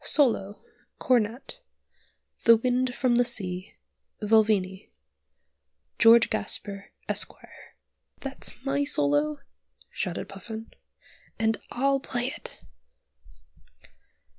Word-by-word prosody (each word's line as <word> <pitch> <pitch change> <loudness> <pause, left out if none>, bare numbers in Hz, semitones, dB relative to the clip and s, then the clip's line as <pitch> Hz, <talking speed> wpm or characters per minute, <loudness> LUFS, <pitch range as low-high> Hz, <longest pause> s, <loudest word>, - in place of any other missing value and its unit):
SOLO 225 -10 +2 0.4
(Cornet) 240 -1 0 0.9
'The 230 -1 +8
Wind 250 +1 0
from 250 -3 +2
the 245 - +5
Sea,' 185 -6 -2 0.4
Vulvini 210 -3 +2 1.1
George 230 0 +6
Gasper, 200 -1 -2 0.2
Esq." - - +2 0.9
"That's 270 -1 -4
my 280 +1 +1
solo," 145 - +1 0.5
shouted 180 -2 -4
Puffin; 220 +3 -9 0.6
"and 220 0 +1
I'll 275 +2 +1
play 245 -1 -2
it!" - - -10
225 Hz, 85 wpm, -26 LUFS, 195-250 Hz, 1.1 s, The